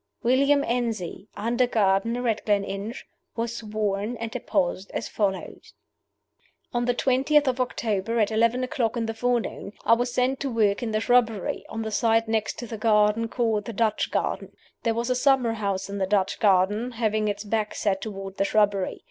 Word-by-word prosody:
William 275 +4 +3
Enzie, 225 -6 -2
under 235 +4 +1
gardener 230 +3 +1
at 220 -2 0
Gleninch, 200 +2 -2 0.3
was 235 0 -3
sworn, 215 +1 -2
and 230 0 -5
deposed 190 -5 -1
as - - -2
follows: 195 -3 -3 1.0
On 240 0 0
the 245 0 +1
twentieth 275 +4 +3
of 255 0 +1
October, 230 -2 -1
at 215 0 +2
eleven 230 +3 +2
o'clock 240 -2 -1
in 230 - 0
the 225 - -3
forenoon, 235 -3 -2
I - - +6
was 245 +1 +1
sent 255 +2 +1
to 275 - -2
work 215 -4 +1
in 235 - -2
the 215 0 0
shrubbery, 230 -5 +1
on 225 0 -4
the 220 - -4
side 225 +1 +2
next 220 -1 -1
to 240 - -5
the 225 -2 -7
garden 215 0 +3
called 225 -3 0
the 230 - -5
Dutch 215 0 0
Garden. - - -2 0.3
There 230 -1 0
was 235 +2 -1
a - - +2
summer 255 -3 +3
house 200 -3 -2
in 200 0 -5
the 190 - 0
Dutch 195 -1 +1
Garden, 205 +4 +2
having 215 -2 0
its 205 0 -2
back 215 0 -2
set 195 -2 0
toward 195 -2 -6
the - - +2
shrubbery. 200 -2 +1
225 Hz, 180 wpm, -25 LUFS, 205-240 Hz, 1.0 s, I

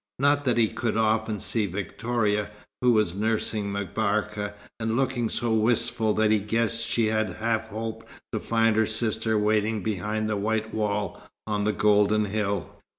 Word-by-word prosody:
Not 145 +2 +2
that 125 -3 +2
he 115 -2 +4
could 110 +1 -2
often 110 -1 +1
see 105 +1 0
Victoria, 105 +2 -1 0.3
who 125 -1 +5
was 105 -6 +2
nursing 105 0 -1
M'Barka, 105 +1 -1 0.2
and 110 0 -1
looking 130 -3 0
so 120 -1 -1
wistful 110 0 +1
that 110 0 +3
he 110 - +4
guessed 115 +2 0
she 115 0 +1
had 110 -3 0
half 110 0 -1
hoped 110 +1 -5 0.3
to - - 0
find 115 -1 +2
her 110 -1 +3
sister 110 0 0
waiting 105 0 +1
behind 110 +1 -1
the 105 -1 -1
white 110 +2 -1
wall 105 -1 -1 0.2
on 105 -1 -1
the 105 - +3
golden 105 +1 +3
hill. 100 -1 -3
110 Hz, 160 wpm, -26 LUFS, 105-115 Hz, 0.3 s, who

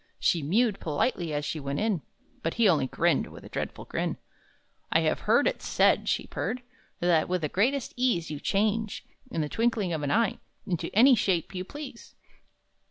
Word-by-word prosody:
She 170 - +2
mewed 200 - +2
politely 165 - -1
as 145 0 -2
she 155 +1 -3
went 140 0 -3
in, 210 -6 0 0.4
But 165 - -2
he 230 -2 +4
only 155 -8 +3
grinned, 170 +6 +1
with - - -12
a - - -10
dreadful - - -4
grin. - - -2 0.7
"I - - +4
have - - +1
heard - - +5
it - - 0
said," - - +3
she - - 0
purred, 255 0 -3 0.4
"That, 170 -2 +3
with 180 -1 0
the 150 - -1
greatest 250 - 0
ease, 235 -11 +1
You 150 - -4
change, 215 +4 0 0.2
in 165 - -2
the 150 - -1
twinkling 225 - 0
of 155 - -2
an 145 - -1
eye, 225 +4 +2 0.3
Into 175 -3 -2
any 255 +5 +7
shape 190 -6 +1
you 185 -1 -3
please!" 275 +2 -9
185 Hz, 185 wpm, -28 LUFS, 160-230 Hz, 0.7 s, any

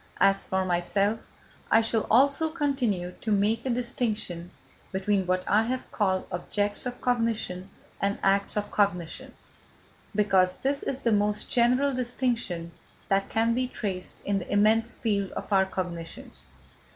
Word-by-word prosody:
As 195 0 +3
for 190 0 0
myself, 195 +5 0 0.4
I 225 - +6
shall 225 -1 0
also 280 +7 +4
continue 265 - -1
to 220 - -2
make 215 +4 +1
a - - 0
distinction 220 -8 -1 0.4
between 190 0 0
what 185 0 +1
I 210 - +4
have 255 +2 -4
called 190 -3 0
objects 205 +5 -1
of 245 0 -6
cognition 225 -6 -1 0.3
and 200 0 0
acts 200 +1 +2
of 205 - -2
cognition, 180 -5 -1 0.8
because 190 -3 +3
this 280 +1 -1
is 270 0 -3
the 230 - +1
most 210 0 0
general 255 +3 +3
distinction 240 -9 -2 0.4
that 195 0 +1
can 230 +1 +2
be 255 +1 0
traced 190 -7 -4
in 200 -1 +1
the 180 - -8
immense 220 +3 +3
field 200 -4 -1
of - - -5
our 190 -1 +4
cognitions. 170 - -6
205 Hz, 145 wpm, -27 LUFS, 190-235 Hz, 0.8 s, I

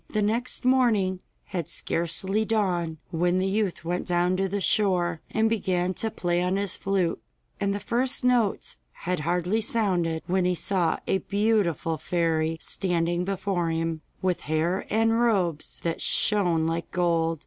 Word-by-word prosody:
The 215 -1 0
next 235 +5 -1
morning 225 -8 +3 0.2
had 170 -5 -4
scarcely 180 +5 0
dawned 180 -7 0
when 175 +1 +1
the 185 - +1
youth 195 -4 -1
went 175 +1 -2
down 175 0 +2
to 195 0 0
the 200 +2 -1
shore, 180 -5 +1
and 220 0 +2
began 185 -5 0
to 225 - -1
play 175 -5 -1
on 180 +1 +1
his 200 -2 0
flute, 190 -3 0 0.4
and 200 0 0
the 200 - -2
first 250 +6 0
notes 245 -5 +1 0.2
had 180 -1 -3
hardly 180 +7 0
sounded 180 -8 0
when 185 +1 +1
he 180 0 +2
saw 170 0 0
a 190 - +1
beautiful 200 -7 0
fairy 165 -2 0
standing 175 -1 -1
before 190 -3 -1
him, 165 -1 -2 0.2
with 185 -2 +1
hair 165 +5 0
and 225 +2 +2
robes 190 -10 0
that 165 -1 -2
shone 175 -7 +2
like 165 +1 -2
gold. 165 -2 +1
180 Hz, 155 wpm, -26 LUFS, 170-205 Hz, 0.4 s, morning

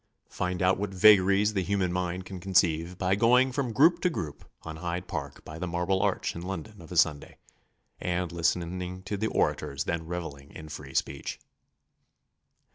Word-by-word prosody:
Find 90 0 -2
out 95 +1 +3
what 100 -1 -3
vagaries 100 +1 +6
the 95 - +1
human 95 -1 0
mind 90 0 -2
can 95 -1 -7
conceive 90 -2 +1
by 95 0 +1
going 125 +5 +4
from 130 -2 -1
group 160 +9 +4
to 180 - +3
group 80 - -5 0.2
on 80 -1 -7
Hyde 90 +1 -4
Park 70 -4 -6
by 80 +1 -8
the 90 - -3
Marble 90 +3 0
Arch - - 0
in 85 - -5
London 95 +2 -6
of 80 - -13
a 90 - -4
Sunday, 75 -3 +2 0.6
and 90 -1 -1
listening 90 +2 -1
to 105 - -3
the 110 +2 -1
orators 70 -8 0
then 80 0 -3
revelling 80 -5 -6
in 80 0 -9
free 70 -3 -9
speech. 70 0 -2
90 Hz, 175 wpm, -28 LUFS, 85-95 Hz, 0.6 s, vagaries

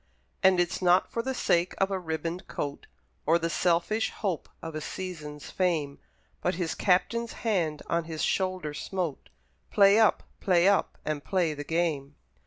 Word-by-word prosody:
And 190 -1 +5
it's 175 +1 0
not 180 0 +4
for 230 - -1
the 265 +2 -3
sake 175 -6 +1
of 195 0 +1
a 190 - 0
ribboned 165 +1 -4
coat, 145 -1 -5 0.4
Or 165 +2 +5
the 165 0 -2
selfish 180 +7 +1
hope 190 -7 -3
of 165 -1 -7
a 155 - -4
season's 150 -5 -6
fame, 160 -7 0 0.4
But 180 - 0
his 170 -2 -2
Captain's 230 +5 +1
hand 170 -9 0
on 170 -1 0
his 160 -1 -4
shoulder 185 -5 0
smote 175 -2 -4 0.4
"Play 200 +1 +6
up! 220 - +4 0.2
play 180 -1 +3
up! 200 0 +2
and 150 -2 -2
play 180 -5 +1
the 145 0 -6
game!" 150 -3 -1
175 Hz, 165 wpm, -28 LUFS, 160-190 Hz, 0.4 s, Play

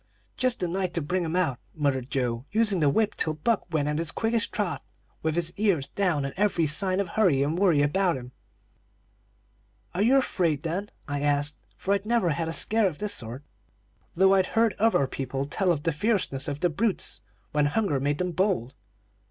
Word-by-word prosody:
"'Just 255 -1 +1
the 180 - -1
night 185 0 -2
to - - +1
bring 175 +4 -1
'em 165 +1 -2
out,' 140 -9 +1 0.2
muttered 140 -4 -1
Joe, 125 -3 -1
using 215 -3 +2
the 150 -3 +4
whip 210 +8 +1
till 155 -1 -1
Buck 195 +3 -1
went 150 -3 0
at 150 +1 -1
his 165 -2 -1
quickest 225 +6 0
trot, 205 -4 -2 0.4
with 160 0 -1
his 170 -1 0
ears 195 -10 +1
down 175 -8 0
and 140 - -4
every 190 -5 +2
sign 185 +6 0
of 200 -3 -1
hurry 170 -11 +3
and 150 +3 -1
worry 175 -6 +3
about 175 +2 +2
him. 125 0 -9 1.6
"'Are 180 - -1
you 250 +6 +5
afraid 175 - +1
of 165 - -1
them?' 200 +3 -3 0.2
I 145 -1 -2
asked, 145 0 0 0.2
for 195 - 0
I'd 200 +1 -1
never 230 -6 +2
had 160 +3 -2
a - - -2
scare 220 +4 +3
of 165 -5 -4
this 210 +4 -1
sort, 120 +4 -5 0.7
though 190 +2 +5
I'd 190 -1 +3
heard 225 -2 +4
other 220 -10 +3
people 135 +1 -3
tell 180 +5 +1
of 150 -4 -1
the 165 - +1
fierceness 155 - 0
of 145 0 -4
the 175 - +3
brutes 200 - -1 0.3
when 150 -1 +2
hunger 170 -3 0
made 145 +2 0
them 180 +2 -1
bold. 170 - 0
170 Hz, 200 wpm, -26 LUFS, 145-200 Hz, 1.6 s, you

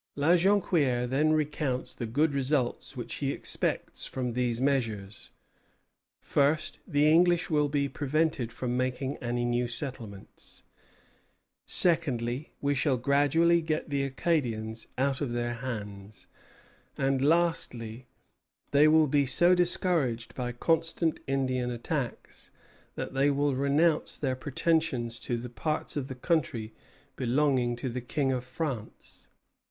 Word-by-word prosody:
La 145 +2 +1
Jonquière 170 -10 +2
then 145 +5 +2
recounts 150 -4 -1
the 120 - -5
good 145 +6 +1
results 135 -2 -1
which - - -5
he - - -1
expects - - -2
from 125 -2 -3
these 120 -1 0
measures: 115 -7 -1 0.9
first, 150 +2 0
the 145 -3 +3
English 175 +2 +4
will 150 -1 +2
be 140 -1 0
prevented 145 -3 -1
from 125 +1 -3
making 130 +2 -1
any 120 -1 -2
new 120 0 0
settlements; 120 -6 -7 1.0
secondly, 140 -6 0
we 145 0 +1
shall 135 -1 +1
gradually 145 +6 +3
get 155 -1 -2
the 140 -1 +1
Acadians 125 -6 -1
out 135 +1 0
of 130 -5 -2
their 120 0 -1
hands; 105 -4 -7 0.7
and 135 -1 +1
lastly, 130 -8 0 0.6
they 145 +2 +6
will 155 0 +5
be 145 -1 +2
so 175 +7 +5
discouraged 170 -9 +1
by 125 -1 -3
constant 165 +5 0
Indian 130 -2 0
attacks 125 +2 -4 0.5
that - - -5
they 135 +2 +3
will 145 0 +1
renounce 145 +4 +1
their 130 -3 -1
pretensions 130 -4 0
to 120 - -2
the 120 +1 -6
parts 155 +6 -3
of 140 -3 -2
the 130 - -6
country 125 -7 -1 0.4
belonging 125 -1 +1
to 125 +2 -5
the 125 0 -3
King 135 +2 -1
of 125 -1 -2
France. 130 -5 -6
135 Hz, 130 wpm, -29 LUFS, 120-155 Hz, 1.0 s, they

